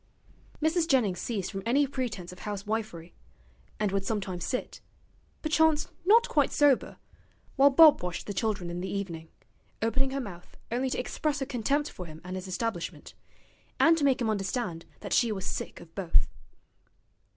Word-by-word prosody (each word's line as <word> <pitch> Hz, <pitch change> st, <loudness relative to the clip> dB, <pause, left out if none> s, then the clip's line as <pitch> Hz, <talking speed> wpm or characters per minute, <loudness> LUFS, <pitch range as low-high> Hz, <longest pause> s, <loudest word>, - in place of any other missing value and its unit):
Mrs. 325 Hz, +1 st, +2 dB
Jennings 225 Hz, -, +2 dB
ceased 205 Hz, -6 st, -3 dB
from 195 Hz, -2 st, -4 dB
any 275 Hz, +6 st, +3 dB
pretence 240 Hz, -10 st, -4 dB
of 180 Hz, -, -12 dB
housewifery, 205 Hz, -4 st, -4 dB, 0.7 s
and 210 Hz, -2 st, +1 dB
would 195 Hz, 0 st, 0 dB
sometimes 190 Hz, -4 st, -3 dB
sit 250 Hz, -, -3 dB, 0.6 s
perchance 310 Hz, -1 st, +3 dB, 0.2 s
not 460 Hz, +5 st, +6 dB
quite 290 Hz, -3 st, +2 dB
sober 290 Hz, -3 st, +3 dB, 0.6 s
while 275 Hz, +1 st, +7 dB
Bob 305 Hz, +2 st, +7 dB
washed 175 Hz, -1 st, -4 dB
the 205 Hz, -, -4 dB
children 195 Hz, -4 st, -1 dB
in 175 Hz, +1 st, -4 dB
the 190 Hz, -, -4 dB
evening, 170 Hz, -5 st, -4 dB, 0.5 s
opening 265 Hz, +4 st, +1 dB
her 275 Hz, +1 st, -3 dB
mouth 180 Hz, -9 st, -9 dB
only 255 Hz, +3 st, 0 dB
to -, -, -2 dB
express 290 Hz, +3 st, -1 dB
her 270 Hz, -, -1 dB
contempt 280 Hz, +3 st, 0 dB
for 180 Hz, -, -8 dB
him 155 Hz, 0 st, -10 dB
and 180 Hz, +1 st, -6 dB
his 185 Hz, 0 st, -5 dB
establishment, 185 Hz, -1 st, -4 dB, 0.7 s
and 330 Hz, 0 st, +6 dB
to 320 Hz, -, -2 dB
make 275 Hz, -1 st, +3 dB
him 235 Hz, -3 st, 0 dB
understand 195 Hz, -4 st, -2 dB, 0.2 s
that -, -, -4 dB
she 235 Hz, -2 st, +3 dB
was 195 Hz, -3 st, -4 dB
sick -, -, -4 dB
of 165 Hz, -1 st, -14 dB
both. 185 Hz, -4 st, +2 dB
220 Hz, 165 wpm, -29 LUFS, 185-275 Hz, 0.7 s, while